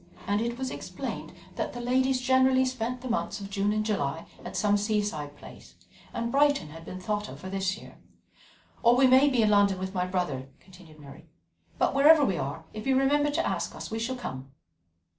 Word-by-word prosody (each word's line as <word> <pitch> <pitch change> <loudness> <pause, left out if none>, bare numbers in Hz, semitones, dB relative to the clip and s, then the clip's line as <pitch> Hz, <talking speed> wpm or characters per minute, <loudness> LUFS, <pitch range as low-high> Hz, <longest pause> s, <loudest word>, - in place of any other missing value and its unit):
and 205 +1 +1
it 235 +1 -2
was 260 0 -3
explained - - -6 0.3
that - - -2
the 245 - -6
ladies 260 +2 +1
generally 260 0 +4
spent 250 -1 -3
the 260 - -6
months 235 -2 -2
of 200 0 -8
June 200 +1 +1
and 215 0 0
July 165 -7 -1 0.2
at - - -6
some 205 -1 +3
seaside 205 -9 -1
place, - - -14 0.4
and 235 0 -3
Brighton 285 - +3
had 165 +2 -11
been 185 +2 -7
thought 210 +2 -2
of - - -10
for 185 - -8
this 195 0 -1
year. - - -14 0.8
"Or 235 0 +5
we 265 +2 +5
may 260 +3 +6
be 245 -4 +2
in 210 - +3
London 200 -2 +4
with 190 +1 -5
my 180 -1 -1
brother," 150 -8 -2
continued 175 -4 -17
Mary, 145 +2 -13 0.5
"but - - +2
wherever 290 +2 +6
we 190 -7 0
are, 145 +4 -4
if 215 +4 -6
you 265 -1 +3
remember 290 +2 +3
to 290 - 0
ask - - -2
us, - - -7
we 225 - -2
shall 245 +3 -2
come." 135 - -7
215 Hz, 205 wpm, -28 LUFS, 185-260 Hz, 0.8 s, may